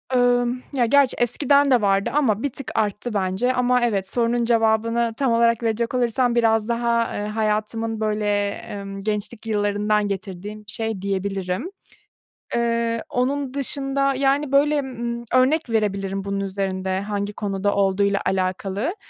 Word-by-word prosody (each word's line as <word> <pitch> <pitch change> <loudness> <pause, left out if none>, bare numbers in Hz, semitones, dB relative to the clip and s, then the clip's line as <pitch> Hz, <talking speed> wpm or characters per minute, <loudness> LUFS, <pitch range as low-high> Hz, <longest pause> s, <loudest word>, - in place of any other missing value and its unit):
ımm, 245 0 +2
ya 250 -3 +2
gerçi 275 +2 +4
eskiden 280 +3 +3
de 245 -3 +5
vardı 195 -1 +2
ama 245 -7 +1
bir 285 - +1
tık 275 0 -7
arttı 210 +2 -1
bence. 200 +6 0
Ama 250 0 +2
evet, 195 -5 -1
sorunun 235 +1 +1
cevabını 230 0 +2
tam 265 -4 +1
olarak 230 0 +3
verecek 230 +1 -1
olursam 245 0 +1
biraz 225 -2 +2
daha, 235 0 0
eee, 205 - -3
hayatımın 220 +1 -1
böyle, 210 -1 0
emm, 200 -1 -7
gençlik 210 +2 -4
yıllarından 210 0 +1
getirdiğim 200 +1 -5
bir 205 -1 -9
şey 220 -4 -3
diyebilirim. 195 - -2 0.8
Eee, 230 -1 0
onun 265 +2 -1
dışında, 275 0 0
yani, 275 +1 +1
böyle, 290 +1 +3
ımm, 235 -3 -4
örnek 260 +3 +3
verebilirim 195 -3 -1
bunun 200 0 -2
üzerinde 190 -1 -2
hangi 205 0 -3
konuda 200 -1 -1
olduğuyla 200 0 +2
alakalı. 190 - -1
225 Hz, 140 wpm, -22 LUFS, 200-245 Hz, 0.8 s, de